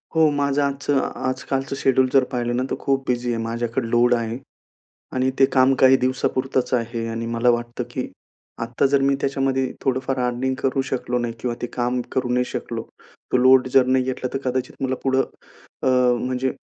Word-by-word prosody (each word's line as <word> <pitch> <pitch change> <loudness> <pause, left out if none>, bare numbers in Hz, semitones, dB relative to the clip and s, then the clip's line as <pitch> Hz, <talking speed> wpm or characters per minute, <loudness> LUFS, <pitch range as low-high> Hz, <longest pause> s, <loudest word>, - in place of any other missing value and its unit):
हो, 160 -1 +5
माझं 145 0 +1
आजचं 140 0 0 0.2
आजकालचं 135 +1 -2
शेड्यूल 130 -1 +3
जर 135 -2 +6
पाहिलं 120 -1 -1
ना, 125 - 0
तर - - +1
खूप 135 -1 0
बिझी 120 -1 -1
आहे. 115 - -2
माझ्याकडे 115 +1 -2
लोड 120 +1 +4
आहे. 115 0 -3 0.8
आणि 130 0 +1
ते 135 - +7
काम 130 0 +3
काही 130 0 +7
दिवसापुरतंच 130 0 -1
आहे. 115 -1 -2
आणि 115 0 -4
मला 120 +1 +3
वाटतं 120 +1 -2
की 125 +1 -4 0.5
आता 115 +3 +1
जर 140 0 +2
मी 140 0 +3
त्याच्यामध्ये 135 -1 0
थोडंफार 130 0 -1
अर्निंग 125 +2 -1
करू 135 0 +1
शकलो 125 -1 -1
नाही 120 -1 -2
किंवा 120 -1 -2
ते - - 0
काम 125 0 -1
करू 130 -1 0
नाही 125 0 +2
शकलो, - - -5 0.5
तो - - +5
लोड 130 +1 +5
जर 130 -1 +6
नाही 130 0 +2
घेतला, 130 0 -3
तर - - +1
कदाचित 130 +1 -4
मला 130 -1 0
पुढं 135 0 +3 0.6
अ, - - -1 0.4
म्हणजे 130 +1 -1
130 Hz, 185 wpm, -22 LUFS, 120-135 Hz, 0.8 s, ते